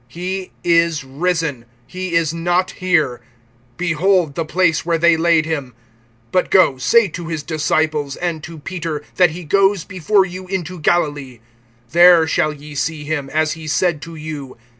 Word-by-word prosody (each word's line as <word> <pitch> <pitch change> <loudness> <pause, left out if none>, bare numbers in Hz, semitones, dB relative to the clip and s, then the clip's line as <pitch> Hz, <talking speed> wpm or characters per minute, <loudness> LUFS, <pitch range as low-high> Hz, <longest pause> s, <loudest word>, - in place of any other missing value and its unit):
He 180 +6 -5
is 165 -3 +2
risen; 150 -2 -2 0.2
he 185 -2 -5
is 165 -2 +1
not 175 +2 0
here. 155 -9 0 0.6
Behold 175 -1 +1
the 165 - -2
place 165 0 +1
where 170 0 0
they 170 0 +4
laid 165 -1 +2
him. 140 -7 -4 0.6
(7)But 185 - +1
go, 165 -8 +4
say 205 - +4
to 170 0 -7
his 160 -3 -4
disciples, 155 -2 -1
and 170 -3 -3
to 165 -1 -9
Peter, 160 -1 -5
that 180 -2 +5
he 175 +3 -8
goes 195 +3 +2
before 190 +1 +1
you 185 0 -8
into 185 -2 -4
Galilee. 145 -6 0 0.5
There 175 0 +7
shall 155 0 +1
ye 150 0 -11
see 150 +2 -3
him, 145 -2 -3
as 155 0 0
he 160 0 -7
said 160 0 0
to 165 +1 -9
you. 150 -5 -7
165 Hz, 160 wpm, -18 LUFS, 150-180 Hz, 0.6 s, There